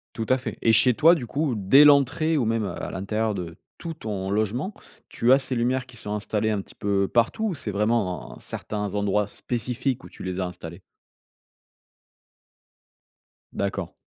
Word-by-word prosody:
Tout 110 -1 -3
à 130 - +4
fait 130 - -5
et 115 - +4
chez 115 +3 +6
toi 165 +5 +6
du 130 -8 -5
coup 145 -2 -1
dès 120 +9 +6
l'entrée 145 +3 +4
ou 130 - +1
même, 115 -1 0
heu, - - -5
à - - -4
l'intérieur 105 +3 -2
de 85 -3 -6 0.2
tout 165 -1 -6
ton 100 -8 -4
logement, 110 - -1 0.3
tu 120 +2 +2
as 135 - +7
ces 130 -2 -3
lumières 125 +2 0
qui 125 -2 -14
sont 105 -1 -6
installées 105 +1 -1
un 105 -2 0
petit - - -12
peu 100 -1 0
partout 120 - +1
ou 180 - -2
c'est 140 -7 -5
vraiment, 105 -3 -1
heu, - - -14
certains 105 -2 -4
endroits 100 0 +1
spécifiques 125 +4 -3
où - - -10
tu - - -11
les 95 0 -4
as 90 - -1
installés? 90 0 -9 2.7
D'accord. 100 -2 -3
110 Hz, 185 wpm, -25 LUFS, 100-130 Hz, 2.7 s, as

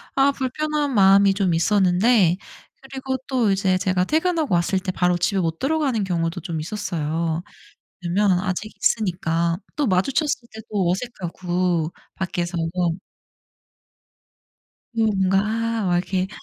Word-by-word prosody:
아 275 +1 +4
불편한 290 +2 -2
마음이 195 -1 +6
좀 190 -3 +1
있었는데 185 +1 +3 0.4
그리고 265 -1 -4
또 245 -6 +2
이제 190 -1 +2
제가 185 -1 +1
퇴근하고 320 - 0
왔을 175 +3 +1
때 185 0 -3
바로 180 -1 +2
집에 195 +2 0
못 165 -1 -2
들어가는 275 -7 0
경우도 170 -2 -1
좀 170 -3 -4
있었어요, 165 -3 -2 0.6
왜나면 185 +1 +2
아직 190 +3 -3
있으니까. 170 -5 0 0.2
또 295 - +1
마주쳤을 245 - 0
때도 210 -4 -2
어색하고 180 -5 -2 0.2
밖에서. 175 -1 -3 2.4
이 225 -1 +2
뭔가 195 -2 +2 0.5
막 175 -1 +2
이렇게 185 +1 -1
190 Hz, 270 characters per minute, -22 LUFS, 175-230 Hz, 2.4 s, 마음이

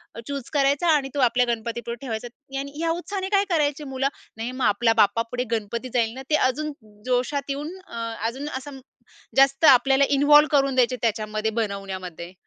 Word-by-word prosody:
अ, - - -7
choose 280 -3 -5
करायचा 285 +3 +2
आणि 275 -2 -1
तो - - -1
आपल्या 250 +1 +2
गणपतीपुढे 235 +1 -5
ठेवायचा 240 -3 -4 0.3
आणि 280 +1 -5
ह्या 330 +1 -1
उत्साहाने 380 +3 -4
काय 400 -1 +3
करायचे 300 -3 0
मुलं, 270 -1 -1 0.3
"नाही 230 +2 -4
मग 255 0 -2
आपल्या 225 +3 +3
बाप्पापुढे 230 +4 +2
गणपती 230 +3 -3
जाईल 230 -2 +1
ना," 260 - -8
ते 305 - +4
अजून 300 +4 -2 0.3
जोशात 255 +3 -1
येऊन 290 +3 -3 0.2
अ, - - -11 0.3
अजून 270 +6 -5
असं 270 +1 -9 0.6
जास्त 275 +3 +4
आपल्याला 270 0 +6 0.2
इन्व्हॉल्व 295 +1 +7
करून 275 -2 +2
द्यायचे 255 0 +3
त्याच्यामध्ये, 215 -1 -1
बनवण्यामध्ये. 190 -5 -5
255 Hz, 170 wpm, -24 LUFS, 230-285 Hz, 0.6 s, इन्व्हॉल्व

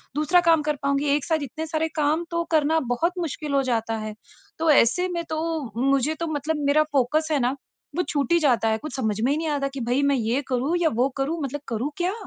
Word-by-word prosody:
दूसरा 320 +4 +3
काम 325 -2 +5
कर 300 0 -1
पाऊँगी 280 +1 +1
एक 295 - -2
साथ 315 -3 0
इतने 310 +5 -5
सारे 315 +1 0
काम 310 +2 +1
तो 335 0 0
करना 315 0 +3
बहुत 335 +8 0
मुश्किल 300 -3 -4
हो 275 - +3
जाता 225 -1 -1
है। 215 0 -5 0.5
तो 325 - +1
ऐसे 295 +7 +4
में 340 -1 -2
तो 310 - -2 0.4
मुझे 275 +2 +2
तो 335 - -2
मतलब 300 +2 -1
मेरा 305 +2 +4
फ़ोकस 290 +3 +1
है 295 - +2
ना 255 +2 +1 0.4
वो 360 - +1
छूट 290 +2 -1
ही 340 - +5
जाता 250 -7 +2
है। 220 - +1
कुछ 305 +2 -7
समझ 220 -5 -1
में 260 +4 +2
ही 295 - +1
नहीं 325 - -2
आता 280 -2 0
कि 275 - -5
भई 255 +3 +2
मैं - - +3
ये 240 +3 0
करूँ 265 +6 0
या 320 - +4
वो 265 - +3
करूँ 305 +5 -1
मतलब 280 +1 -4
करूँ 235 +6 -2
क्या? 360 +2 0
290 Hz, 240 wpm, -24 LUFS, 265-320 Hz, 0.5 s, काम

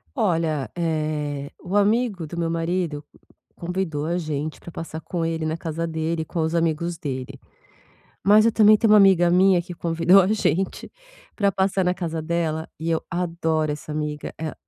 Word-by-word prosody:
Olha, 160 -7 0
eh, 150 -3 -2
o 180 +3 -5
amigo 205 -4 +1
do 170 - -8
meu 170 - 0
marido 165 -2 -2 0.5
convidou 170 -4 -3
a 170 - -1
gente 155 -2 -3
pra 170 - -11
passar 160 -1 -7
com 170 -2 -3
ele 165 -1 -2
na 155 0 -1
casa 165 0 -4
dele, 160 0 -2
com 165 +1 -4
os 160 +1 -1
amigos 170 +1 0
dele. 130 -5 -5 0.9
Mas 210 +2 +6
eu 230 - +4
também 215 -1 +6
tenho 215 -1 +4
uma - - +8
amiga 185 -4 +5
minha 185 -1 +4
que 175 0 -8
convidou 170 +3 +4
a 185 - +1
gente 195 -3 -1 0.4
pra 200 -2 +2
passar 190 0 +1
na 180 0 +1
casa 165 -2 -3
dela 160 -1 -2
e 165 +1 -2
eu 160 - 0
adoro 165 -3 -1
essa 150 +1 -7
amiga, 150 -1 -4
eh, 160 -1 -4
165 Hz, 175 wpm, -23 LUFS, 155-180 Hz, 0.9 s, uma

